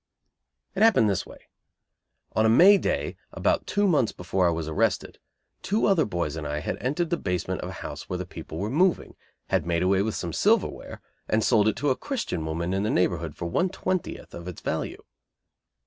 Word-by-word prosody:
It 195 - -3
happened 200 - +5
this 95 - -2
way. - - -13 0.9
On 110 - +3
a 110 - +4
May 190 - +7
day, - - -2
about - - 0
two 205 0 +1
months 145 - +2
before 90 +1 0
I - - +4
was 80 -2 -2
arrested, 80 - -1 0.4
two 210 +3 +1
other 195 -5 +3
boys 85 -6 -2
and 80 -2 -4
I 75 0 -2
had 75 - -3
entered 150 +6 -1
the 170 - +2
basement 90 - -2
of - - -5
a - - -8
house - - -7
where 90 - -2
the 90 - -4
people 80 -2 -9
were 105 +5 -2
moving, 180 +5 +1 0.3
had - - +1
made 85 0 +1
away 95 +1 +3
with 110 +1 -1
some 85 -2 -4
silverware, - - 0 0.3
and 110 0 +2
sold 110 -3 +4
it 110 - +2
to 145 -1 0
a - - +2
Christian 230 - -3
woman 85 +3 -2
in 95 - 0
the 105 - 0
neighborhood 90 - 0
for - - -5
one 175 - +1
twentieth 185 -1 -3
of 85 +1 -8
its 90 - -7
value. - - -3
105 Hz, 205 wpm, -26 LUFS, -, 0.9 s, May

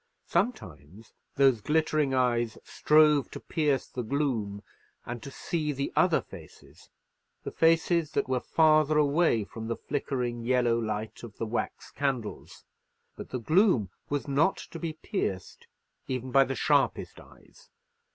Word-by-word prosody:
Sometimes 95 - -3 0.2
those 135 -5 +4
glittering 155 0 +1
eyes 120 -3 +1
strove 150 -2 +3
to - - -8
pierce 150 -5 0
the 125 - -6
gloom, 115 -6 -2 0.4
and 120 -1 -6
to 140 - -8
see 150 +2 -3
the 140 0 -4
other - - +3
faces, - - -15 0.5
the - - -5
faces 165 0 +2
that - - 0
were 130 -1 0
farther 155 +1 +3
away 150 -5 +3
from 110 +2 -8
the 115 - -2
flickering 125 -4 -3
yellow 120 -1 +2
light 110 -1 -4
of 115 -4 -11
the 115 - -3
wax 115 +2 -4
candles; 135 -6 -4 0.5
but - - -9
the 130 - -3
gloom 145 - +2 0.2
was 145 0 -2
not 145 +7 +2
to 165 - -9
be 165 -2 -3
pierced 100 - -4 0.4
even 130 0 -4
by 135 +1 +5
the 135 - -3
sharpest - - +1
eyes. - - -19
135 Hz, 140 wpm, -28 LUFS, 115-155 Hz, 0.5 s, by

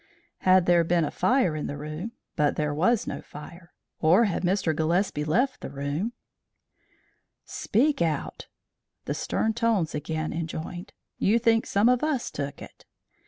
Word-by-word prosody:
"Had 185 -1 +4
there 175 -1 +4
been 170 -1 +2
a - - -4
fire 250 - +2
in 150 - -3
the 145 - -5
room 155 +9 -6 0.2
but 150 -1 +2
there 150 -1 -1
was 190 +9 +2
no - - -5
fire. 170 +4 -12 0.3
Or 175 +8 +5
had 195 - -1
Mr. 175 -3 +1
Gillespie 165 0 0
left 230 - +1
the - - -6
room 145 +11 -3 0.7
" - - -41 0.2
"Speak 275 - +2
out!" 160 -2 -2 0.6
the - - -2
stern 220 - -1
tones 225 -8 +1
again 155 +1 -3
enjoined. 165 +2 -5 0.3
"You 215 +4 +3
think 225 -1 +2
some 200 +3 +3
of 250 +1 +3
us 300 -5 -1
took 140 -1 -5
it?" - - -14
175 Hz, 160 wpm, -26 LUFS, 155-225 Hz, 0.7 s, Or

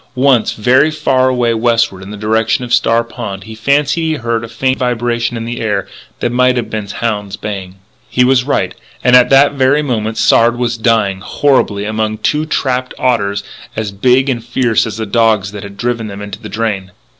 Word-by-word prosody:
Once, 130 -3 +3
very, 125 +4 +3
very - - +1
far 135 -4 +1
away 120 -2 +1
westward 115 -4 +1
in 95 - -9
the 105 - -7
direction 110 +3 0
of 120 - -4
Star 115 +1 +3
Pond 100 -4 -7
he 110 - -10
fancied 140 +7 +1
he 160 -1 0
heard 115 -3 -2
a - - -5
faint 130 +3 -1
vibration 120 -1 -1
in 115 - -5
the 120 +1 -4
air 100 -3 -1 0.3
that 120 - 0
might 125 +1 +3
have 120 - -3
been 110 -2 -3
hounds 105 -2 -3
baying. 95 -3 -6 0.3
He 125 - +2
was 125 0 +3
right. 140 - -1 0.3
And 125 +1 +5
at 125 -1 +6
that 135 +1 +5
very 140 +2 +2
moment 110 -5 -2
Sard 120 +1 +4
was 120 -1 -1
dying, 110 -5 +1
horribly, 105 -3 +1
among 110 0 -2
two 150 +8 0
trapped 130 -4 -1
otters 100 -5 0 0.3
as 110 -2 -3
big 125 +7 +2
and 120 -4 -1
fierce 115 -2 +1
as 110 -1 -6
the 110 - -3
dogs 110 -2 +1
that 105 -1 -7
had 100 0 -10
driven 120 -1 -2
them 100 -1 -8
into 100 - -7
the - - -8
drain. 100 -5 -3
115 Hz, 200 wpm, -14 LUFS, 105-125 Hz, 0.3 s, at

